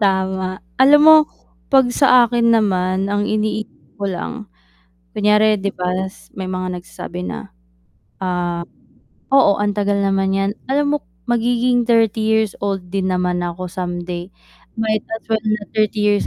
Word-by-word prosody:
Tama, 190 Hz, -1 st, 0 dB, 0.2 s
alam 285 Hz, +3 st, +7 dB
mo 315 Hz, 0 st, +9 dB, 0.5 s
'pag 265 Hz, -3 st, +5 dB
sa 255 Hz, -2 st, +5 dB
akin 235 Hz, 0 st, +2 dB
naman, 190 Hz, -2 st, +1 dB
ang 205 Hz, 0 st, 0 dB
iniisip 215 Hz, 0 st, -3 dB
ko 200 Hz, -, -1 dB
lang 180 Hz, +4 st, -4 dB, 0.8 s
kunyari 210 Hz, +1 st, +3 dB
'di 200 Hz, +1 st, -2 dB
ba 180 Hz, 0 st, -2 dB, 0.2 s
s 190 Hz, -, -16 dB
may 190 Hz, -1 st, -4 dB
mga 185 Hz, -1 st, -3 dB
nagsasabi 180 Hz, 0 st, -8 dB
na, -, -, -7 dB, 0.7 s
ah 175 Hz, -2 st, -2 dB, 0.7 s
oo, 270 Hz, -7 st, +5 dB
"Ang 205 Hz, 0 st, 0 dB
tagal 200 Hz, 0 st, +1 dB
naman 195 Hz, -1 st, +1 dB
'yan," 195 Hz, 0 st, +1 dB, 0.2 s
alam 290 Hz, +1 st, +1 dB
mo -, -, -4 dB, 0.3 s
magiging 240 Hz, +1 st, +2 dB
30 225 Hz, -2 st, +2 dB
years 220 Hz, -1 st, +1 dB
old 195 Hz, -3 st, -3 dB
din 190 Hz, -1 st, -1 dB
naman 180 Hz, -1 st, 0 dB
ako 175 Hz, +1 st, -5 dB
someday, 175 Hz, 0 st, -5 dB, 0.5 s
might 220 Hz, -1 st, -1 dB
as 225 Hz, -, -15 dB
well 220 Hz, -1 st, +1 dB
na 215 Hz, -1 st, 0 dB
30 215 Hz, 0 st, +1 dB
years 205 Hz, -1 st, +2 dB
200 Hz, 150 wpm, -19 LUFS, 185-220 Hz, 0.8 s, mo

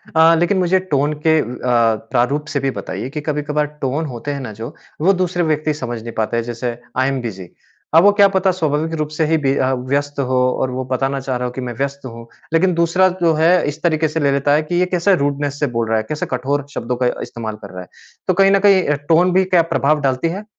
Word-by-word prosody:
अ, 165 Hz, +1 st, +6 dB
लेकिन 175 Hz, +3 st, +1 dB
मुझे 185 Hz, +1 st, +2 dB
टोन 145 Hz, +1 st, +1 dB
के 160 Hz, 0 st, +5 dB
अ, -, -, 0 dB, 0.7 s
प्रारूप 140 Hz, +5 st, +1 dB
से 140 Hz, -, +1 dB
भी 135 Hz, 0 st, -1 dB
बताइए 105 Hz, +1 st, -5 dB
कि 150 Hz, +2 st, -5 dB
कभी-कभार 150 Hz, 0 st, -1 dB, 0.2 s
टोन 140 Hz, +4 st, -1 dB
होते 130 Hz, +1 st, -5 dB
हैं 140 Hz, -, -4 dB
ना 120 Hz, -4 st, -6 dB
जो, 110 Hz, +3 st, -8 dB, 0.3 s
वो 190 Hz, +5 st, +4 dB
दूसरे 180 Hz, -1 st, -1 dB
व्यक्ति 155 Hz, -1 st, 0 dB
समझ 120 Hz, -6 st, -5 dB
नहीं 115 Hz, +1 st, -7 dB
पाते 110 Hz, +1 st, 0 dB
हैं 115 Hz, -, 0 dB
जैसे 120 Hz, 0 st, -4 dB, 0.2 s
आई 130 Hz, 0 st, +2 dB
एम 135 Hz, -1 st, -2 dB
बिज़ी। 95 Hz, -6 st, -6 dB, 0.5 s
अब 165 Hz, -, +7 dB
वो 205 Hz, -, +7 dB
क्या 205 Hz, -1 st, +5 dB
पता 190 Hz, -1 st, +1 dB
स्वाभाविक 160 Hz, -2 st, -1 dB
रूप 150 Hz, -, -1 dB
से 160 Hz, -, +2 dB
ही 160 Hz, +1 st, +2 dB
बी 140 Hz, -2 st, 0 dB
अ, 130 Hz, 0 st, +1 dB
व्यस्त 140 Hz, +3 st, -2 dB
हो 130 Hz, -1 st, +1 dB, 0.2 s
और 130 Hz, -, 0 dB
वो 130 Hz, +1 st, -4 dB
बताना 135 Hz, +2 st, -1 dB
चाह 130 Hz, -1 st, -3 dB
रहा 125 Hz, -, -3 dB
हो -, -, -5 dB
कि 130 Hz, +1 st, -6 dB
मैं -, -, -5 dB
व्यस्त 140 Hz, 0 st, -3 dB
हूँ। 115 Hz, -1 st, -9 dB, 0.3 s
लेकिन 180 Hz, +3 st, +3 dB
दूसरा 170 Hz, +3 st, +3 dB
जो 165 Hz, -1 st, +4 dB
है 160 Hz, +2 st, +3 dB, 0.2 s
इस 150 Hz, +2 st, -5 dB
तरीके 160 Hz, -2 st, +2 dB
से 155 Hz, +2 st, -3 dB
ले 140 Hz, -2 st, +2 dB
लेता 140 Hz, +1 st, +2 dB
है 150 Hz, +1 st, +2 dB
कि 155 Hz, +3 st, -4 dB
ये 180 Hz, -, +3 dB
कैसे 185 Hz, +3 st, +3 dB
रूडनेस 145 Hz, -1 st, -2 dB
से 145 Hz, -, +1 dB
बोल 115 Hz, -1 st, 0 dB
रहा 110 Hz, -, +2 dB
है, 110 Hz, -, -1 dB
कैसे 155 Hz, -, -2 dB
कठोर 140 Hz, +3 st, -1 dB
शब्दों 120 Hz, +2 st, -3 dB
का -, -, +3 dB
इस्तेमाल 110 Hz, -2 st, -6 dB
कर -, -, -10 dB
रहा 90 Hz, 0 st, -7 dB
है। 90 Hz, -, -11 dB, 0.4 s
तो 185 Hz, -, +3 dB
कहीं 195 Hz, +2 st, +4 dB
न 195 Hz, -, +4 dB
कहीं 190 Hz, -2 st, +5 dB
अ, 150 Hz, -, +2 dB
टोन 175 Hz, +3 st, +4 dB
भी 190 Hz, +1 st, +4 dB
क्या 180 Hz, -2 st, +4 dB
प्रभाव 150 Hz, +2 st, +2 dB
डालती 135 Hz, +2 st, 0 dB
है? 195 Hz, +5 st, -6 dB
145 Hz, 255 wpm, -18 LUFS, 130-165 Hz, 0.7 s, अब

